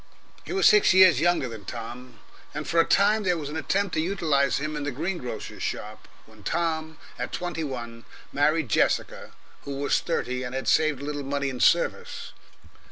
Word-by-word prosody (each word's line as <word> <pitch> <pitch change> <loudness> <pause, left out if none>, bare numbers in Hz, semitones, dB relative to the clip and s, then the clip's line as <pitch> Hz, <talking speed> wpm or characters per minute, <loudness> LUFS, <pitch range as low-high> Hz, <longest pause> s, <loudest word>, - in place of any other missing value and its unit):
He - - -7
was 390 - +1
six 415 - +5
years 185 -7 +7
younger 175 -5 +2
than 110 -3 -9
Tom, 120 +4 -8 0.4
and 150 0 -4
for 165 - +2
a 165 - +5
time 210 +2 +3
there 180 -4 +1
was 145 -3 -5
an 150 - -6
attempt 190 +4 -1
to 155 - +1
utilise 155 -7 +1
him 150 +2 -3
in 150 - -3
the 145 - -1
green 170 +7 -3
grocer's 120 -4 -7
shop 105 0 -5 0.2
when 110 -1 -18
Tom 160 - -2 0.2
at - - -3
twenty 175 -2 -3
one 115 -5 -6 0.3
married 150 +1 +2
Jessica - - 0 0.3
who 140 - -6
was 140 +1 +1
thirty, 125 -6 -2
and 125 0 -5
had 135 - -4
saved 155 -3 +2
a - - -4
little 145 0 -3
money 140 0 -2
in 130 -2 -6
service. - - +1
150 Hz, 190 wpm, -26 LUFS, 130-170 Hz, 0.4 s, years